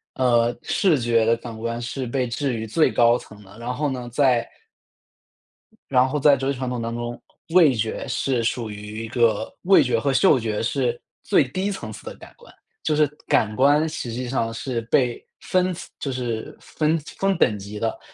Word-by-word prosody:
呃， 120 -2 +2
视 180 -8 +2
觉 115 -2 +2
的 115 +1 +3
感 115 -1 -8
官 115 +1 -3
是 125 +1 -4
被 125 +1 -1
置 130 +3 -2
于 110 -1 -3
最 155 +9 +2
高 120 0 +4
层 105 -3 -13
的， 100 +2 -16
然 120 +1 -4
后 145 +2 -1
呢 125 -2 -5
在 125 -2 +2 1.4
然 130 -1 +4
后 130 - -2
在 140 0 +5
哲 135 +1 -1
学 - - -8
传 130 -1 -3
统 125 -1 -3
当 115 0 -3
中， 120 0 -5 0.3
味 165 -5 +6
觉 110 0 -3
是 130 -3 0
属 115 -1 -2
于 105 +1 -7
一 - - -9
个 115 -3 +1
味 195 +2 +6
觉 120 -3 +1
和 140 +3 0
嗅 150 -2 +5
觉 110 -2 -2
是 120 -1 -1 0.2
最 - - +3
低 185 +8 -2
层 120 - -5
次 - - -11
的 - - -7
感 - - -14
官， - - -17 0.3
就 155 - 0
是 150 0 +4 0.2
感 110 -1 +2
官 145 +4 +4
实 155 -6 -5
际 125 +1 -4
上 115 -3 -1
是 120 +1 -3
被 120 +1 +1 0.2
分 185 -1 +1 0.2
就 140 - -3
是 120 -4 -4
分 155 +1 0 0.2
分 195 -1 +1
等 110 - +2
级 100 +2 -8
的， 115 +1 -2
125 Hz, 210 characters per minute, -23 LUFS, 115-140 Hz, 1.4 s, 味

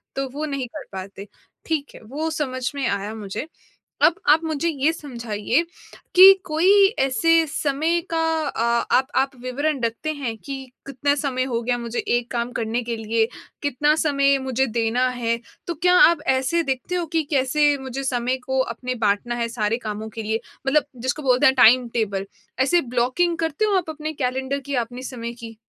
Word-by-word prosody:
तो 270 0 -2
वो 300 +2 -3
नहीं 275 -4 -3
कर 300 - -6
पाते। 195 +1 -8 0.4
ठीक 305 -3 -3
है, - - -12
वो 290 +9 -4
समझ 255 -5 -2
में 275 -3 -1
आया 200 +1 -2
मुझे। 210 +5 -6 0.6
अब 335 - +6 0.2
आप 315 - +4
मुझे 315 0 -1
ये 300 0 +1
समझाइए 240 -3 -2 0.5
कि 380 +2 +11
कोई 370 +5 +5
ऐसे 325 +5 +3
समय 305 +4 0
का 330 - 0 0.3
अ, 235 -1 0
आप 260 - +2
आप 270 +1 +3
विवरण 275 +3 -1
रखते 235 +7 -2
हैं 265 -7 -4
कि 270 -1 -5 0.2
कितना 275 +1 0
समय 270 -3 -1
हो 240 -3 -2
गया 245 +1 0
मुझे 235 0 -5
एक 240 0 -1
काम 240 0 -2
करने 230 +1 -2
के 235 0 -3
लिए, 225 0 0 0.4
कितना 290 +1 +2
समय 280 -3 +2
मुझे 265 0 0
देना 235 +2 0
है? 240 -2 -1 0.3
तो 345 - -2
क्या 360 +3 +3
आप 335 -3 +6
ऐसे 265 +6 +1
देखते 265 +4 -3
हो 350 -2 -1
कि 325 -1 +2
कैसे 290 +1 +2
मुझे 265 +1 -5
समय 250 0 0
को 265 0 -1
अपने 255 -1 -3
बाँटना 205 +4 +1
है 235 -1 -2
सारे 225 -1 -1
कामों 215 -2 -5
के 225 - -4
लिए, 220 +1 -1 0.3
मतलब 295 +2 +3 0.2
जिसको 270 +4 -2
बोलते 255 -2 +3
हैं 265 - +5
टाइम 245 0 +6
टेबल 200 -4 -2 0.3
ऐसे 315 +7 +4
ब्लॉकिंग 255 +7 0
करते 325 +4 -1
हो 415 -2 +2
आप 350 -4 -1
अपने 310 0 -5
कैलेंडर 265 -1 -2
की 280 +1 -6
या 250 - +2
अपने 245 +2 -6
समय 235 -3 -6
की? 230 -2 -10
260 Hz, 185 wpm, -22 LUFS, 235-300 Hz, 0.6 s, कि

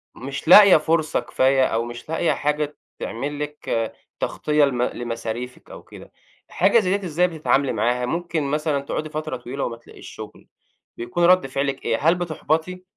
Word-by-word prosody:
مش 135 +4 -7
لاقية 200 0 +9
فرصة 155 0 0
كفاية 130 0 +2
أو 115 +1 0
مش 120 +5 -9
لاقية 165 +1 +1
حاجة 150 0 -1 0.2
تعمل 145 +5 -4
لِك 145 -6 -3 0.3
تغطية 150 -1 +1
لم 125 -3 -2
لمصاريفك 120 +1 -5
أو - - -11
كده، - - -14 0.4
حاجة 200 +5 +3
زي 195 -1 +1
ديّة 190 -3 -6
إزاي 175 +3 +2
بتتعاملي 150 -4 0
معاها؟ 120 +3 0
ممكن 170 +1 -2
مثلًا 150 0 -1
تقعدي 155 +2 -4
فترة 155 -3 -4
طويلة 125 +3 -5
وما 115 -1 -4
تلاقيش - - -14
شغل، - - -11 0.5
بيكون 120 +9 -2
رد 180 -5 +5
فعلِك 135 0 -3
إيه، 115 -1 +1
هل 165 +4 +4
بتُحبَطي؟ 175 +1 -2
150 Hz, 160 wpm, -22 LUFS, 125-165 Hz, 0.5 s, لاقية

